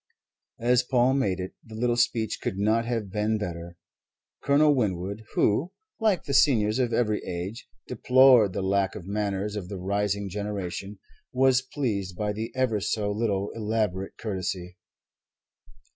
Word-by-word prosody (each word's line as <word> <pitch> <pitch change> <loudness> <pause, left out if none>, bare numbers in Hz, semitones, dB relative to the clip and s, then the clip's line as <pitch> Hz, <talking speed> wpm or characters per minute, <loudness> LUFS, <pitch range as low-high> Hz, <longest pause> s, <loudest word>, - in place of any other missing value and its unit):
As 120 +1 +3
Paul 125 0 +2
made 100 -9 0
it, 90 0 -5
the 110 - -11
little 120 +1 +1
speech 120 -2 0
could 95 - -3
not 110 +3 +2
have 115 -5 -3
been 105 +1 0
better. 85 -3 -6 0.6
Colonel 145 +1 +4
Winwood, 100 -3 -2
who 145 - +1 0.3
(like 215 -6 +2
the 140 - -4
seniors 115 -5 +3
of 125 -2 +1
every 110 -2 0
age) 90 +7 -5 0.2
deplored 125 -6 +5
the 95 - -2
lack 95 +1 +1
of 100 -5 -8
manners 100 0 -2
of 95 -4 -5
the 100 - -5
rising 100 +2 -1
generation, 100 0 -5 0.3
was 130 0 +3
pleased 105 -10 -3
by 105 -1 -1
the 110 +2 -5
ever 125 -5 +1
so 105 +1 -1
little 100 -2 -1
elaborate 105 -4 -2
courtesy. 90 -4 -4
105 Hz, 145 wpm, -26 LUFS, 95-120 Hz, 0.6 s, deplored